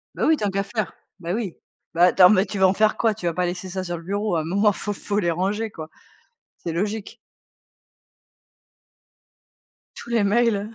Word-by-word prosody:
Bah, -, -, 0 dB
oui, 315 Hz, -1 st, +4 dB
tant 205 Hz, -1 st, -1 dB
qu'à 195 Hz, +1 st, -1 dB
faire, 215 Hz, -2 st, -3 dB, 0.3 s
bah, 170 Hz, +1 st, -3 dB
oui. 210 Hz, -6 st, -3 dB, 0.4 s
Bah, 170 Hz, +1 st, +3 dB
attends, 180 Hz, 0 st, +7 dB
mais 200 Hz, -1 st, +4 dB
tu 205 Hz, -, -6 dB
veux 190 Hz, -, +5 dB
en 185 Hz, -, +4 dB
faire 215 Hz, +1 st, +2 dB
quoi? 225 Hz, -2 st, +2 dB
Tu 195 Hz, -4 st, -9 dB
vas 170 Hz, -, +1 dB
pas 180 Hz, +1 st, 0 dB
laisser 180 Hz, +1 st, -4 dB
ça 185 Hz, +1 st, -4 dB
sur 175 Hz, -1 st, -4 dB
le 165 Hz, -, -11 dB
bureau. 200 Hz, +1 st, -1 dB
À 160 Hz, -, +1 dB
un -, -, -5 dB
moment, 200 Hz, +5 st, +2 dB
faut 205 Hz, +1 st, -4 dB
faut 205 Hz, +1 st, -2 dB
les 170 Hz, -3 st, +1 dB
ranger, 205 Hz, +5 st, -1 dB
quoi. 160 Hz, -1 st, -9 dB, 0.7 s
C'est 170 Hz, -, -5 dB
logique. 210 Hz, +5 st, -3 dB, 2.8 s
Tous 235 Hz, -, -10 dB
les 230 Hz, -3 st, +2 dB
mails, 215 Hz, 0 st, +1 dB
200 Hz, 200 wpm, -23 LUFS, 180-215 Hz, 2.8 s, attends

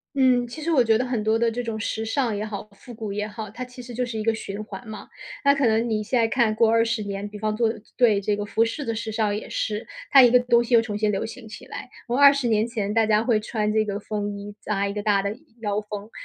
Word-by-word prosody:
嗯， 255 Hz, -2 st, +3 dB
其 240 Hz, +6 st, -9 dB
实 320 Hz, +2 st, -2 dB
我 270 Hz, -7 st, +4 dB
觉 225 Hz, -1 st, +3 dB
得 255 Hz, -, -1 dB
很 240 Hz, -4 st, -2 dB
多 220 Hz, +1 st, +2 dB
的 230 Hz, 0 st, +2 dB
这 240 Hz, +2 st, -3 dB
种 225 Hz, -2 st, -4 dB
时 220 Hz, 0 st, -2 dB
尚 225 Hz, -1 st, 0 dB
也 205 Hz, -, -3 dB
好， 210 Hz, -1 st, -6 dB
复 220 Hz, +5 st, -13 dB
古 215 Hz, -3 st, -5 dB
也 210 Hz, 0 st, -2 dB
好， 215 Hz, 0 st, -7 dB
它 230 Hz, +5 st, -6 dB
其 250 Hz, 0 st, -12 dB
实 245 Hz, 0 st, -9 dB
就 250 Hz, +2 st, 0 dB
是 235 Hz, -2 st, -5 dB
一 -, -, -2 dB
个 225 Hz, +1 st, +1 dB
循 205 Hz, -1 st, -6 dB
环 215 Hz, +2 st, -9 dB
嘛。 220 Hz, -1 st, -9 dB, 0.3 s
那 280 Hz, -1 st, +5 dB
可 275 Hz, -2 st, +1 dB
能 225 Hz, +1 st, +2 dB
你 215 Hz, -1 st, 0 dB
现 235 Hz, +3 st, +1 dB
在 225 Hz, -, +3 dB
看 230 Hz, -3 st, +2 dB
过 220 Hz, 0 st, +4 dB
20 230 Hz, -1 st, +2 dB
年， 200 Hz, 0 st, -4 dB
比 210 Hz, -, -8 dB
方 215 Hz, 0 st, -1 dB
说 225 Hz, -1 st, +2 dB, 0.2 s
对 220 Hz, -5 st, +4 dB
这 205 Hz, +1 st, 0 dB
个 205 Hz, -, -3 dB
服 215 Hz, +2 st, +1 dB
饰 230 Hz, +6 st, -1 dB
的 230 Hz, -3 st, -2 dB
时 225 Hz, 0 st, -4 dB
尚 215 Hz, -1 st, 0 dB
也 210 Hz, -, -5 dB
是。 215 Hz, 0 st, -3 dB, 0.2 s
它 275 Hz, -, +8 dB
一 245 Hz, -2 st, +7 dB
个 250 Hz, -, +6 dB
东 240 Hz, -1 st, +3 dB
西 240 Hz, +1 st, -1 dB
又 230 Hz, -, +7 dB
重 210 Hz, -2 st, -4 dB
新 215 Hz, 0 st, +1 dB
流 195 Hz, -, -1 dB
行 225 Hz, 0 st, -8 dB
起 215 Hz, -, -10 dB
来， -, -, -8 dB, 0.2 s
我 245 Hz, +3 st, 0 dB
20 280 Hz, -2 st, +6 dB
年 220 Hz, -1 st, +2 dB
前 210 Hz, -4 st, -2 dB
大 225 Hz, 0 st, +3 dB
家 215 Hz, 0 st, +3 dB
会 230 Hz, -3 st, +2 dB
穿 215 Hz, -1 st, -1 dB
这 215 Hz, 0 st, +2 dB
个 200 Hz, -1 st, -2 dB
风 205 Hz, -1 st, -4 dB
衣 205 Hz, 0 st, -8 dB
扎 200 Hz, -1 st, -1 dB
1 200 Hz, -, -2 dB
个 210 Hz, 0 st, -4 dB
大 205 Hz, -2 st, +2 dB
的 200 Hz, +1 st, -2 dB, 0.3 s
腰 205 Hz, -1 st, 0 dB
封， 210 Hz, 0 st, -8 dB
220 Hz, 295 characters per minute, -24 LUFS, 210-240 Hz, 0.3 s, 它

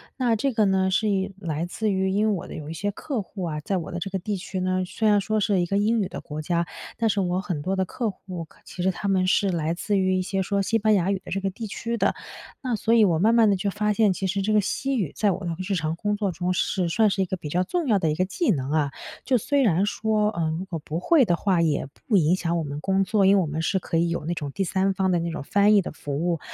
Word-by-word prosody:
那 245 Hz, -4 st, +1 dB
这 275 Hz, +4 st, 0 dB
个 220 Hz, -2 st, +3 dB
呢， 190 Hz, -1 st, +2 dB
是 210 Hz, +3 st, +1 dB
因 195 Hz, 0 st, -1 dB
来 165 Hz, -2 st, -2 dB
自 215 Hz, +4 st, -2 dB
于 190 Hz, 0 st, +1 dB
因 205 Hz, +3 st, +2 dB
为 -, -, +2 dB
我 180 Hz, -, -4 dB
的 -, -, -9 dB
有 155 Hz, -1 st, -7 dB
一 -, -, -4 dB
些 205 Hz, +5 st, -2 dB
客 240 Hz, +2 st, -3 dB
户 190 Hz, 0 st, -8 dB
啊， 155 Hz, -3 st, -3 dB
在 190 Hz, +6 st, -2 dB
我 170 Hz, -, -5 dB
的 175 Hz, -, -4 dB
这 185 Hz, -, -4 dB
个 190 Hz, -1 st, -2 dB
地 200 Hz, +2 st, -3 dB
区 190 Hz, 0 st, -5 dB
呢， 185 Hz, 0 st, 0 dB
虽 220 Hz, +4 st, 0 dB
然 205 Hz, -1 st, +5 dB
说 215 Hz, +2 st, 0 dB
是 200 Hz, -2 st, +2 dB
一 175 Hz, -, +1 dB
个 195 Hz, +3 st, 0 dB
英 220 Hz, +3 st, +2 dB
语 200 Hz, -, 0 dB
的 -, -, -7 dB
国 155 Hz, 0 st, -6 dB
家， 170 Hz, +2 st, 0 dB, 0.3 s
但 225 Hz, -1 st, +1 dB
是 200 Hz, -, +1 dB
我 180 Hz, 0 st, 0 dB
很 175 Hz, -7 st, -3 dB
多 185 Hz, +5 st, -1 dB
的 190 Hz, -, +1 dB
客 225 Hz, +5 st, -2 dB
户， 185 Hz, -3 st, -8 dB
可 -, -, -24 dB
其 180 Hz, -, -6 dB
实 190 Hz, -, +3 dB
他 200 Hz, -, -5 dB
们 190 Hz, -1 st, +2 dB
是 195 Hz, +1 st, +3 dB
来 165 Hz, -2 st, -1 dB
自 200 Hz, +4 st, -1 dB
于 185 Hz, -1 st, +2 dB
一 -, -, +1 dB
些 190 Hz, +1 st, -1 dB
说 200 Hz, +1 st, 0 dB
西 225 Hz, +3 st, +1 dB
班 215 Hz, 0 st, +3 dB
牙 190 Hz, -1 st, +2 dB
语 195 Hz, -, -1 dB
的 -, -, -8 dB
这 195 Hz, -, -1 dB
个 195 Hz, -, 0 dB
地 220 Hz, +3 st, -6 dB
区 230 Hz, +3 st, -3 dB
的。 -, -, +1 dB, 0.5 s
那 255 Hz, -3 st, -1 dB
所 220 Hz, +2 st, +1 dB
以 230 Hz, -2 st, +6 dB
我 170 Hz, -6 st, +3 dB
慢 220 Hz, +5 st, +4 dB
慢 225 Hz, -2 st, +5 dB
地 200 Hz, -, +3 dB
就 200 Hz, +2 st, -1 dB
发 210 Hz, +1 st, 0 dB
现， 210 Hz, -2 st, +3 dB
其 190 Hz, +1 st, -2 dB
实 195 Hz, +2 st, -1 dB
这 215 Hz, +2 st, 0 dB
个 210 Hz, -, +5 dB
西 270 Hz, +7 st, -1 dB
语 185 Hz, -, -1 dB
在 205 Hz, -2 st, +2 dB
我 190 Hz, -, -4 dB
的 170 Hz, -, -2 dB, 0.2 s
日 200 Hz, -, 0 dB
常 160 Hz, -2 st, -1 dB
工 205 Hz, +4 st, -1 dB
作 205 Hz, -2 st, -1 dB
中 180 Hz, +2 st, -1 dB
是 180 Hz, 0 st, 0 dB
算 215 Hz, +6 st, +3 dB
是 195 Hz, 0 st, 0 dB
一 -, -, +2 dB
个 185 Hz, -, -3 dB
比 155 Hz, -4 st, -7 dB
较 180 Hz, +4 st, +1 dB
重要 275 Hz, -, +1 dB
的 160 Hz, -4 st, +1 dB
一 -, -, -1 dB
个 180 Hz, -, +1 dB
技 195 Hz, -, 0 dB
能 135 Hz, -5 st, -2 dB
啊， 150 Hz, -2 st, +1 dB, 0.3 s
就 260 Hz, -, +3 dB
虽 285 Hz, +5 st, +1 dB
然 190 Hz, -2 st, +3 dB
说， 210 Hz, 0 st, +1 dB
呃， 170 Hz, -5 st, -1 dB
如 185 Hz, -, -4 dB
果 175 Hz, -4 st, -5 dB
不 155 Hz, +2 st, -4 dB
会 290 Hz, -, +4 dB
的 175 Hz, -4 st, +2 dB
话， 185 Hz, -1 st, +1 dB
也 155 Hz, -4 st, 0 dB, 0.2 s
不 220 Hz, -, +2 dB
影 170 Hz, 0 st, +4 dB
响 170 Hz, -2 st, -1 dB
我 -, -, -2 dB
们 145 Hz, 0 st, -5 dB
工 195 Hz, +4 st, +1 dB
作， 200 Hz, 0 st, +2 dB
因 195 Hz, +1 st, +6 dB
为 195 Hz, -, +4 dB
我 170 Hz, -, -1 dB
们 155 Hz, +2 st, -3 dB
是 190 Hz, +4 st, +1 dB
可 170 Hz, -, -2 dB
以 170 Hz, +1 st, +2 dB
有 170 Hz, -, -2 dB
那 170 Hz, -, -1 dB
种 145 Hz, -3 st, -4 dB
第 195 Hz, -, -1 dB
三 190 Hz, +2 st, +1 dB
方 190 Hz, 0 st, +1 dB
的 175 Hz, -, +2 dB
那 170 Hz, 0 st, -2 dB
种 165 Hz, -, -5 dB
翻 205 Hz, +7 st, +4 dB
译 200 Hz, -, +5 dB
的 -, -, -6 dB
服 145 Hz, +3 st, -3 dB
务， 170 Hz, -2 st, 0 dB
190 Hz, 330 characters per minute, -25 LUFS, 170-210 Hz, 0.5 s, 以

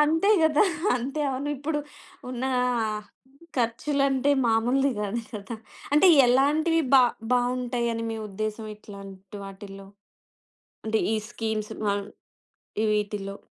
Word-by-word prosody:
అంతే 320 Hz, +7 st, +3 dB
కదా! 310 Hz, +1 st, +4 dB, 0.3 s
అంతే 270 Hz, +5 st, -3 dB
అవును 270 Hz, +2 st, -3 dB
ఇప్పుడు 295 Hz, +2 st, -2 dB, 0.5 s
ఉన్న 255 Hz, 0 st, -5 dB, 0.4 s
ఆహ్, 215 Hz, -1 st, -2 dB, 0.5 s
ఖర్చులంటే 270 Hz, +3 st, +1 dB, 0.2 s
మామూలుది 245 Hz, +5 st, +2 dB
కాదు 210 Hz, +3 st, -2 dB
కదా! 220 Hz, +2 st, -6 dB, 0.4 s
అంటే 300 Hz, +6 st, +6 dB, 0.2 s
ఎలాంటివి 300 Hz, +6 st, +3 dB
బా 265 Hz, -, +9 dB, 0.3 s
బావుంటాయ‌ని 245 Hz, -2 st, 0 dB
మీ 225 Hz, -, -3 dB
ఉద్దేశం 215 Hz, +2 st, -4 dB
ఇట్లాంటి 195 Hz, -1 st, -11 dB
వాటిల్లో? 195 Hz, 0 st, -10 dB, 1.0 s
అంటే 220 Hz, 0 st, +1 dB
ఈ -, -, +2 dB
స్కీమ్స్ 220 Hz, -2 st, -3 dB
బాన్ 200 Hz, -1 st, 0 dB, 0.9 s
వీటిలో. 205 Hz, -1 st, -2 dB
235 Hz, 105 wpm, -26 LUFS, 210-275 Hz, 1.0 s, బా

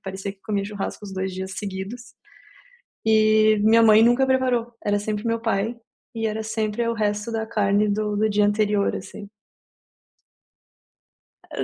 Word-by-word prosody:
parecia 195 Hz, +1 st, -6 dB
que 195 Hz, -, -28 dB
comia 200 Hz, -1 st, -2 dB
churrasco 205 Hz, 0 st, -6 dB
os 200 Hz, -, -8 dB
2 190 Hz, 0 st, -3 dB
dias 190 Hz, +1 st, -5 dB
seguidos 200 Hz, +4 st, -6 dB, 1.1 s
e 215 Hz, 0 st, +4 dB
minha 225 Hz, +2 st, +5 dB
mãe 220 Hz, -1 st, +7 dB
nunca 240 Hz, +3 st, +4 dB
preparou, 255 Hz, -3 st, 0 dB
era 205 Hz, 0 st, +1 dB
sempre 210 Hz, +2 st, -3 dB
meu 230 Hz, 0 st, 0 dB
pai, 225 Hz, 0 st, -1 dB, 0.4 s
e 225 Hz, 0 st, -2 dB
era 220 Hz, 0 st, -2 dB
sempre, 220 Hz, 0 st, -2 dB
é 230 Hz, -, 0 dB
o -, -, 0 dB
resto 210 Hz, 0 st, -2 dB
da 225 Hz, -1 st, -2 dB
carne 210 Hz, -2 st, +1 dB
do 210 Hz, 0 st, -1 dB
do 220 Hz, -, +2 dB
dia 210 Hz, 0 st, +2 dB
anterior, 205 Hz, -1 st, +1 dB
assim. 200 Hz, +2 st, -9 dB, 2.2 s
Eh, -, -, -2 dB
215 Hz, 160 wpm, -23 LUFS, 205-225 Hz, 2.2 s, mãe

